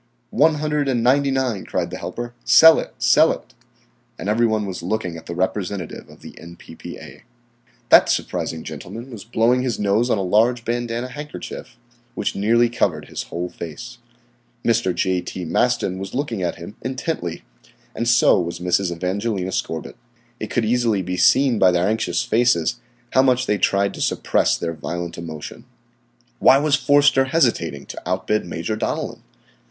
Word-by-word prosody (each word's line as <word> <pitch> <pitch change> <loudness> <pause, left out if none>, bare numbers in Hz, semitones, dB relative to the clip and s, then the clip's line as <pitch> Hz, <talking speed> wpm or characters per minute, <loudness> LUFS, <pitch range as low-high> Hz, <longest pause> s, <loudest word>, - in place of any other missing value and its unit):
"One 155 +1 +4
hundred 150 -1 -1
and 120 -4 0
ninety 140 +3 +3
nine," 130 -7 -1
cried - - -3
the - - -6
helper. 120 0 -6
"Sell 160 +7 +7
it! - - -7
Sell - - +5
it!" - - -8 0.6
And 100 - -4
every 115 +2 +3
one 110 -1 0
was 95 -3 -5
looking 90 -1 -3
at 80 - -11
the 85 - -5
representative 95 -1 -3
of - - -16
the - - -10
N.P.P.A. 85 -1 -11 0.7
That - - +7
surprising 80 -1 -2
gentleman 120 +4 -8
was 110 -5 -8
blowing 120 +2 +2
his 125 -3 -2
nose 105 +4 +1
on 110 - +2
a 100 - -1
large 115 +6 +2
bandanna 120 +1 -2
handkerchief, 150 -3 -8 0.4
which - - -2
nearly 115 +4 +3
covered 85 -10 -1
his - - -4
whole 85 +1 -3
face. 120 +11 -9 0.7
Mr. 115 -5 +2
J. 90 +1 0
T. 90 0 -6
Maston 95 0 0
was 95 +3 -6
looking 125 -7 -2
at 90 -1 -1
him 85 +4 -10
intently, 130 - -4 0.5
and 115 - -3
so 120 -4 +5
was 85 0 -4
Mrs. 90 +1 0
Evangelina 95 +2 -2
Scorbitt. 80 -3 -4 0.4
It 110 - -5
could 120 - 0
easily 115 -4 +1
be 90 +1 -3
seen 130 +4 +4
by 95 - +6
their 90 +1 +1
anxious 110 -5 0
faces 120 -2 +1 0.3
how 130 - +5
much 130 -1 +2
they 105 - 0
tried 100 +1 +1
to - - -8
supress - - +1
their 85 -1 -3
violent 85 +2 -5
emotion. 80 -3 -8 0.8
Why 135 - +6
was 145 +1 0
Forster 140 0 +4
hesitating 115 - 0
to - - -8
outbid 95 +2 -1
Major 85 +6 -3
Donellan? - - -3
110 Hz, 165 wpm, -21 LUFS, 90-125 Hz, 0.8 s, Sell